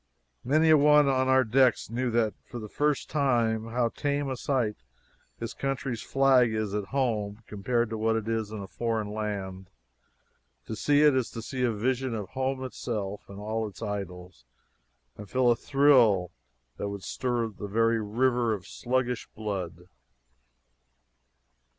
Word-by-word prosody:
Many 155 +5 +4
a 155 - +8
one 150 0 +6
on 130 -1 +2
our 130 0 +5
decks 125 +1 +3
knew 125 +2 -1
then 115 -2 +2 0.2
for 120 - -7
the 110 -2 -6
first 150 +5 0
time 120 -6 +1
how 120 0 0
tame 145 +2 -2
a - - -2
sight 120 -5 -1 0.6
his 115 0 -5
country's 135 -4 -3
flag 135 -3 +4
is 110 -2 -2
at 105 -1 -2
home 110 -4 -2
compared 115 +3 -1
to 110 - -3
what 110 +1 +2
it 110 -1 -2
is 110 -2 -1
in 105 -2 -5
a - - -8
foreign 115 0 -2
land. 100 -3 -4 1.0
To 110 - -5
see 145 +7 +3
it 150 -3 +6
is 130 -3 0
to 115 - -7
see 130 +2 -4
a 125 -2 +2
vision 125 +3 -1
of 105 -4 -5
home 130 +1 -2
itself 105 -6 -5
and 100 - -9
all 110 +1 -2
its 105 +2 -10
idols, 90 - -6 0.8
and 105 -2 -9
feel 130 -1 +3
a - - +3
thrill 120 - +4 0.5
that 100 - -3
would 100 -2 -6
stir 120 -2 -1
a 115 - -2
very 115 +3 0
river 120 +1 +1
of 95 - -10
sluggish 125 -1 -2
blood! 95 -5 -5
115 Hz, 160 wpm, -28 LUFS, 105-130 Hz, 1.0 s, a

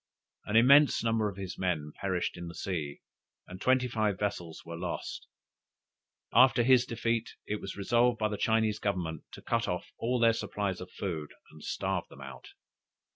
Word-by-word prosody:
An 105 - -2
immense 140 +5 +6
number 115 -2 +1
of 100 - -10
his 95 -2 -6
men 80 -5 -1
perished 95 -3 -1
in 85 0 -7
the 85 - -8
sea, 80 -5 -4 0.4
and 90 0 -10
twenty 130 0 +3
five 110 -5 0
vessels 90 -5 -4
were 85 - -6
lost. - - -5 1.1
After 125 0 +6
his 125 0 +5
defeat, 115 0 -1
it 105 0 -3
was 95 - -6
resolved 120 +4 +2
by 110 -1 0
the 105 - -2
Chinese 110 -1 +1
Government 90 -6 -2
to - - -10
cut 115 -2 0
off 90 -1 -3
all 125 +2 0
their 115 -1 +5
supplies 100 -4 -3
of 90 - -8
food, 80 -8 -5 0.2
and 75 -1 -14
starve - - -2
them - - -14
out. - - -10
105 Hz, 175 wpm, -30 LUFS, 90-115 Hz, 1.1 s, immense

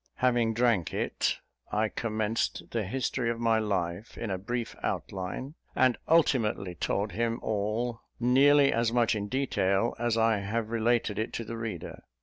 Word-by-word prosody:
Having 120 -3 +2
drank 115 -8 +2
it, - - 0 0.3
I 110 +1 +2
commenced 110 0 -2
the 115 -2 0
history 125 +2 -1
of 115 0 -2
my 115 -1 +3
life 100 -1 -2
in 115 -4 -3
a 95 - -2
brief 120 +4 -3
outline, 100 +9 -3 0.2
and 130 -2 +4
ultimately 115 - +2
told 100 +5 -1
him 115 +4 -1
all; 110 +3 -1 0.2
nearly 140 +3 +5
as 115 0 +1
much 120 -1 +3
in 105 -1 -2
detail 115 -4 +1
as 120 -1 +1
I 115 -2 +3
have 110 +3 -2
related 115 -2 +1
it 110 - -2
to 115 - -3
the 115 +1 -6
reader. 115 -6 -5
115 Hz, 155 wpm, -29 LUFS, 105-120 Hz, 0.3 s, nearly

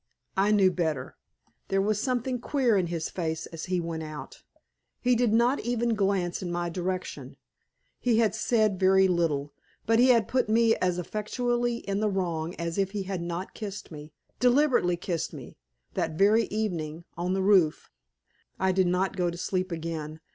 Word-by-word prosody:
I 195 +2 +3
knew 200 -3 +5
better. 160 -5 -2 0.5
There 195 - +1
was 210 +1 +1
something 250 -1 -1
queer 255 -3 +1
in 185 -3 +1
his 165 -2 -3
face 160 -2 -3
as 165 -1 -7
he 180 -1 0
went 165 -1 -4
out. 155 -1 -8 0.6
He 250 0 +2
did 235 -2 +2
not 240 +5 +3
even 240 0 0
glance 195 -4 0
in 180 -2 -4
my 175 0 -2
direction. 185 +1 -4 0.6
He 240 -3 +2
had 220 -3 +3
said 215 -3 +1
very 190 0 +5
little, 160 -5 0 0.3
but 225 +1 +3
he 250 - +6
had 230 -4 +4
put 255 -4 0
me 225 +1 +4
as 180 -1 0
effectually 240 +6 -2
in 200 0 0
the 215 0 +1
wrong 170 -4 -2
as 170 +2 -3
if 195 0 0
he 205 -2 -2
had 190 -2 -4
not 170 +2 -4
kissed 205 -4 -7
me 150 0 -9 0.3
deliberately 250 -8 +3
kissed 170 -2 -3
me - - -10 0.3
that 160 - -1
very 215 +4 +4
evening, 170 -7 -3
on 180 +2 -1
the 190 - 0
roof. 190 -6 +3 0.7
I 190 0 +2
did 185 -1 +2
not 185 +2 0
go 180 -2 +1
to 170 - -6
sleep 185 +1 -2
again. 160 -2 -5
190 Hz, 175 wpm, -27 LUFS, 170-220 Hz, 0.7 s, he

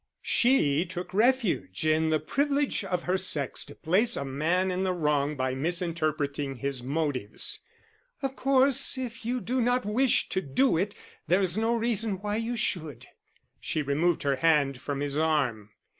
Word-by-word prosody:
She 165 - +3
took 180 0 -7
refuge 220 - +1
in 155 +1 +2
the 155 -1 +2
privilege 285 - 0
of 180 -3 -2
her 185 +1 0
sex 150 -8 -1
to 145 - -12
place 190 +8 +2
a 140 - -3
man 165 +8 0
in 180 +1 -2
the 190 -1 0
wrong 150 -3 0
by 130 0 -1
misinterpreting 155 -3 -2
his 135 +1 -4
motives. 135 -5 -2 0.6
"Of 270 0 -2
course, 270 0 +3
if 245 -2 -6
you 250 +1 0
do 250 +2 -1
not 245 0 +1
wish 245 +5 +2
to 190 - 0
do 155 - +2
it, 195 +5 -1 0.3
there 185 +3 +3
is 180 -2 +2
no 225 +2 +1
reason 225 -2 0
why 205 +1 -2
you 230 +2 -2
should." 155 - -2 0.5
She 155 - -2
removed 155 +5 +1
her 140 -2 +1
hand 140 -4 +2
from 140 0 -3
his 145 0 -1
arm. 135 -10 0
170 Hz, 165 wpm, -28 LUFS, 145-225 Hz, 0.6 s, She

